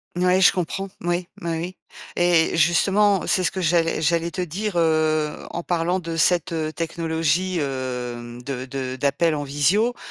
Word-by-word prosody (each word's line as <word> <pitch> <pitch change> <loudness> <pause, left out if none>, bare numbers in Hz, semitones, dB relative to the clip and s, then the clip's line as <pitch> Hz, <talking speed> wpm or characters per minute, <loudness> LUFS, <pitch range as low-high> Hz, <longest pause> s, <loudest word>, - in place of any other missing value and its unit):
Mouais, 180 +1 +3
je 185 - +7
comprends, 190 +2 -3
oui 175 +1 -1
oui, 170 - -3
oui. 170 +3 -4 0.4
Et 175 -2 +3
justement, 190 +5 +3
c'est 185 - +1
ce - - +2
que 190 - -5
j'allais 165 -1 +2
j'allais 165 +2 +1
te 185 +2 -4
dire, 190 +5 -3
heu, 155 -2 +1
en 170 - -5
parlant 175 +2 0
de 165 -1 -5
cette, 170 +1 +2
heu, 160 -1 -2
technologie, 165 +2 -1
heu, 125 -4 -4
de 130 -2 -4
de 130 -1 -4
d'appels 145 +5 +1
en 145 -1 -2
visio, 175 - +1
165 Hz, 165 wpm, -23 LUFS, 150-180 Hz, 0.4 s, je